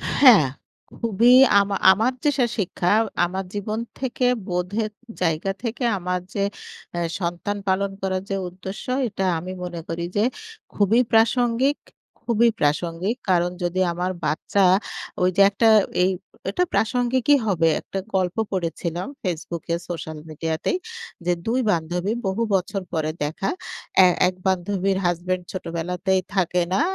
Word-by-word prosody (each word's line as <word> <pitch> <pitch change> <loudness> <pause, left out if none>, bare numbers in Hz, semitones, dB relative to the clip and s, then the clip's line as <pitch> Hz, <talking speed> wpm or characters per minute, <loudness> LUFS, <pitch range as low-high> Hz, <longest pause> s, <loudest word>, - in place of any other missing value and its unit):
হ্যাঁ। 240 - +8 0.5
খুবই 230 +2 +4 0.3
আমা 200 0 0 0.2
আমার 225 +7 +2
যে 295 - +4
শা 250 - +4
শিক্ষা, 180 -2 0 0.3
আমার 190 +2 -3
জীবন 210 +2 -3 0.2
থেকে 255 -1 -1 0.2
বোধের 190 +5 -2 0.3
জায়গা 165 +2 +1
থেকে 240 +2 -3
আমার 180 0 -2
যে 200 - 0 0.5
এ - - 0 0.2
সন্তান 175 +3 -2
পালন 195 +1 +1
করার 190 -1 -1
যে 195 - -1
উদ্দেশ্য, 190 +2 -8 0.2
এটা 195 -3 -2
আমি 180 +3 -6
মনে 175 -1 -5
করি 165 +1 -3
যে 205 - +3 0.5
খুবই 210 +3 +3
প্রাসঙ্গিক, 240 +4 +3 0.4
খুবই 235 0 +3
প্রাসঙ্গিক। 165 +7 0
কারণ 175 -1 +3
যদি 175 +1 -1
আমার 180 +2 -2
বাচ্চা, 160 +6 +1 0.6
ওই 180 - +4
যে 200 - +4
একটা 205 +3 +2 0.4
এই 185 - +3 0.4
এটা 360 - +1
প্রাসঙ্গিকই 245 +5 +2
হবে। 170 -4 +2
একটা 195 - -5 0.2
গল্প 185 0 0
পড়েছিলাম 175 -1 -3 0.2
Facebook 170 -2 -4
এ - - +3
সোশ্যাল 160 -2 -5
মিডিয়াতেই। 160 - -2 0.5
যে 180 - +3
২ 235 +3 +1
বান্ধবী 175 +4 -1
বহু 190 +4 -1
বছর 195 +1 -1
পরে 155 -1 0
দেখা। 160 +6 -2 0.6
এ - - +7 0.2
এক 185 - -2
বান্ধবীর 190 +1 0
হাসব্যান্ড 175 +1 -1
ছোটবেলাতেই 180 +1 -1
থাকে 180 -1 +2
না, 270 - +2
190 Hz, 140 wpm, -23 LUFS, 175-215 Hz, 0.6 s, হ্যাঁ